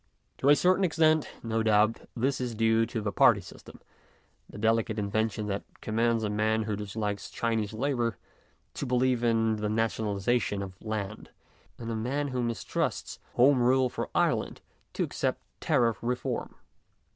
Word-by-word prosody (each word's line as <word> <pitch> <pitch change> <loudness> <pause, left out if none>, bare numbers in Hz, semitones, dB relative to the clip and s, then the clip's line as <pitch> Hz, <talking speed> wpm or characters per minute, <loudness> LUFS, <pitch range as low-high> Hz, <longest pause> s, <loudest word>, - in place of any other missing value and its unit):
To 140 - +3
a 145 - +8
certain 185 +4 +3
extent, 160 -3 +3
no 115 -1 0
doubt, 110 0 +2
this 130 +2 0
is 120 -2 -3
due 115 +1 +3
to 115 -1 -3
the 105 -1 -2
party - - +5
system; - - -13 0.7
the - - -10
delicate 110 0 +1
invention 110 +1 -1
that 100 -1 -2 0.2
commands 115 +1 0
a 105 - 0
man 110 +1 +1
who 105 -1 -2
disliked 105 0 -4
Chinese 115 -3 -1
Labour 120 -2 -1 0.6
to 140 - -4
believe 125 -1 +2
in 115 -2 +2
the 105 0 -2
nationalization 110 -1 0
of 95 -1 -7
land, 105 -1 -5 0.5
and 115 -1 -5
a - - -2
man 135 +6 -1
who 130 -1 -2
mistrusts 115 -1 -2 0.2
Home 130 +1 +5
Rule 130 +1 +3
for - - -4
Ireland - - +1 0.3
to - - 0
accept - - -1 0.2
Tariff 115 -4 +2
Reform. 125 +1 -3
115 Hz, 155 wpm, -28 LUFS, 110-125 Hz, 0.7 s, a